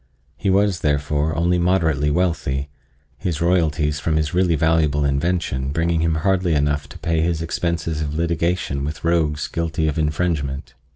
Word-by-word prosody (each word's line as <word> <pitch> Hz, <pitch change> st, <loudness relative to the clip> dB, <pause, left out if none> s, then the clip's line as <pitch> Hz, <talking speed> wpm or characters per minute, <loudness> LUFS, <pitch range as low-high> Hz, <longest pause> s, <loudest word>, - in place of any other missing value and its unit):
He -, -, -2 dB
was, 95 Hz, -1 st, +2 dB
therefore, 75 Hz, +1 st, 0 dB
only 90 Hz, +2 st, +2 dB
moderately 80 Hz, -5 st, +2 dB
wealthy, 75 Hz, -4 st, 0 dB, 0.5 s
his 85 Hz, -4 st, -2 dB
royalties 80 Hz, -4 st, +1 dB
from 80 Hz, +1 st, -1 dB
his 75 Hz, -1 st, 0 dB
really 90 Hz, -2 st, +3 dB
valuable 75 Hz, -2 st, +2 dB
invention 70 Hz, -2 st, 0 dB
bringing 80 Hz, +2 st, +1 dB
him 80 Hz, -1 st, +1 dB
hardly 90 Hz, 0 st, +1 dB
enough 75 Hz, 0 st, 0 dB
to -, -, -10 dB
pay 80 Hz, -2 st, 0 dB
his 85 Hz, -1 st, 0 dB
expenses 80 Hz, -1 st, -2 dB
of 75 Hz, -1 st, -3 dB
litigation 85 Hz, -3 st, -1 dB
with 75 Hz, +1 st, -5 dB
rogues 80 Hz, -3 st, +1 dB
guilty 80 Hz, -1 st, -1 dB
of 75 Hz, +1 st, -1 dB
infringement. 75 Hz, -3 st, -1 dB
80 Hz, 155 wpm, -21 LUFS, 75-85 Hz, 0.5 s, really